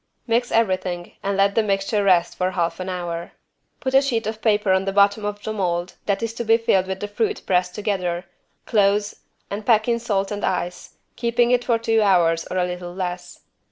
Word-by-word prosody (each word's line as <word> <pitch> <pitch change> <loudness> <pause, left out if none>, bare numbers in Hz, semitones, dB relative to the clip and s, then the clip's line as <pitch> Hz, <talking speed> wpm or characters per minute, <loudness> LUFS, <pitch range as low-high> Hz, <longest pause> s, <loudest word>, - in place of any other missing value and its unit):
Mix 240 +1 0
everything 185 -5 0
and 195 0 -1
let 200 0 +3
the 225 - +3
mixture 200 0 0
rest 180 -3 +3
for 185 0 0
half 170 -2 -2
an 185 0 -4
hour. 175 -2 -4 0.5
Put 260 -1 -3
a 270 - +7
sheet 240 -6 -1
of 220 0 -4
paper 210 -3 +2
in 190 0 +1
the 195 - 0
bottom 200 +1 +3
of 205 0 -4
the 220 - -3
mold 175 -3 -2
that 200 +2 0
is 225 0 -2
to 235 - -4
be 225 0 +4
filled 190 -5 +2
with 190 0 -4
the 205 - -2
fruit 420 - -2
pressed 180 -1 +1
together, 185 -4 -2 0.4
close, 205 -1 +2 0.4
and 205 +2 -4
pack 220 0 +3
in 235 -1 +1
salt 200 -4 -1
and 205 0 -4
ice, 180 -1 -3 0.2
keeping 235 0 +1
it 245 -1 +3
for 235 -2 +2
two 225 -1 +1
hours 170 -5 +3
or 185 - -3
a 180 - +2
little 180 0 -6
less. 180 -1 -5
200 Hz, 210 wpm, -22 LUFS, 180-225 Hz, 0.5 s, a